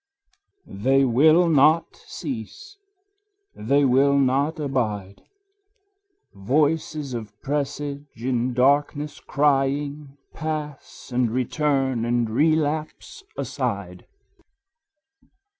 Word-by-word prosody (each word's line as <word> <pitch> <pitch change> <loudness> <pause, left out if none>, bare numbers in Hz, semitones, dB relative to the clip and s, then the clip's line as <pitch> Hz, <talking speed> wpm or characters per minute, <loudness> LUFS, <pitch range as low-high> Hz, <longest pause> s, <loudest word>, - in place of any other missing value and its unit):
They 135 +7 +1
will 155 +8 +4
not 155 +1 +3
cease, 170 - -8 0.7
they 140 +6 +1
will 135 +2 +3
not 140 +4 +1
abide: 110 -9 -3 1.1
Voices 145 +5 -1
of 110 -3 -7
presage 145 0 -3
in 125 +1 -2
darkness 145 +3 +1
crying 140 0 -1 0.2
Pass 150 -4 -6
and 125 -1 +1
return 130 0 0
and 120 0 0
relapse 155 - -1
aside. - - -4
140 Hz, 75 wpm, -23 LUFS, 125-150 Hz, 1.1 s, will